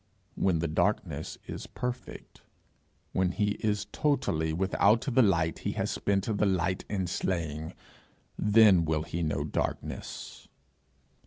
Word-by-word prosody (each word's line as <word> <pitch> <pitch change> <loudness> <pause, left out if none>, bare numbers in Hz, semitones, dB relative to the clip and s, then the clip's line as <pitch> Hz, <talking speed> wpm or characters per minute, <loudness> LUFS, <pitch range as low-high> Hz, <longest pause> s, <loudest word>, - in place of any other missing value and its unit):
When 95 -3 +1
the 85 +1 -1
darkness 80 -2 -1
is - - -7
perfect, 125 0 -6 0.7
when 95 -1 +1
he 105 +1 +1
is 105 -2 0
totally 80 - 0
without 100 +5 +3
the 130 -2 +3
light 85 -7 +2
he - - -2
has - - -1
spent 100 -1 0
the 105 -2 +1
light 90 0 0
in 95 -3 -1
slaying, 80 -2 -2 0.6
then 105 -4 +5
will 80 -1 0
he 85 +2 -4
know 75 -3 0
darkness. 75 - -4
95 Hz, 130 wpm, -29 LUFS, 80-105 Hz, 0.7 s, then